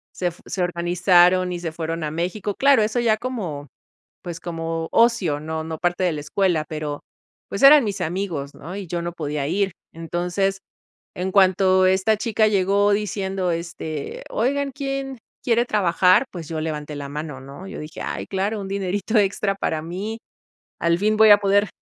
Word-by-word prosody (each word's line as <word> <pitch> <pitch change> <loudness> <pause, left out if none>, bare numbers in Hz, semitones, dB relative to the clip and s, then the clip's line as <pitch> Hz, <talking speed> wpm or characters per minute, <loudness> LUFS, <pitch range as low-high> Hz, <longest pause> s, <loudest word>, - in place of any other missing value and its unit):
se 175 -1 -1
fu 170 - -19
se 185 - -2
organizaron 180 +1 +3
y 175 - -4
se 170 -2 -4
fueron 165 0 -4
a 150 - -1
México. 185 +5 -3
Claro, 275 -4 +5
eso 215 +3 0
ya 225 -2 +2
como 190 - -5 0.6
pues, 170 -1 -6
como 165 -1 -4
ocio 230 -11 +3
no 160 +1 -4
no 160 0 -5
parte 175 +2 0
de 175 - +2
la 150 - -4
escuela, 165 +1 0
pero 150 -2 -4 0.5
pues, 200 - -4
eran 290 +1 +9
mis 200 -2 -3
amigos, 160 -5 -3
¿no? 175 +5 -8
Y 200 -2 -6
yo 175 +1 -3
no 170 0 -4
podía 150 -3 -3
ir 195 +3 0 0.2
entonces, 175 +4 -1 0.6
en 185 +1 -2
cuanto 190 -1 +4
esta 190 +4 +3
chica 215 0 +2
llegó 200 0 +2
diciendo 195 -3 -1
este 165 -3 -5
oigan, 275 +4 0
¿quién 275 -1 -4 0.3
quiere 235 0 +2
trabajar? 185 +1 +3
Pues, 170 -4 -7
yo 160 -1 -3
levanté 150 -1 -4
la 140 -1 -6
mano, 150 -2 -6
¿no? 140 +8 -10
Yo 195 - -7
dije 155 +1 -8
ay, - - -4
claro, 200 +2 -2
un 195 - -6
dinerito 200 +3 -1
extra 200 0 +1
para 160 -5 -2
mí. 195 +7 -5 0.6
Al 170 0 +2
fin 215 +3 +1
voy 220 - +7
a 205 - +9
poder 200 0 +2
185 Hz, 180 wpm, -22 LUFS, 165-205 Hz, 0.6 s, eran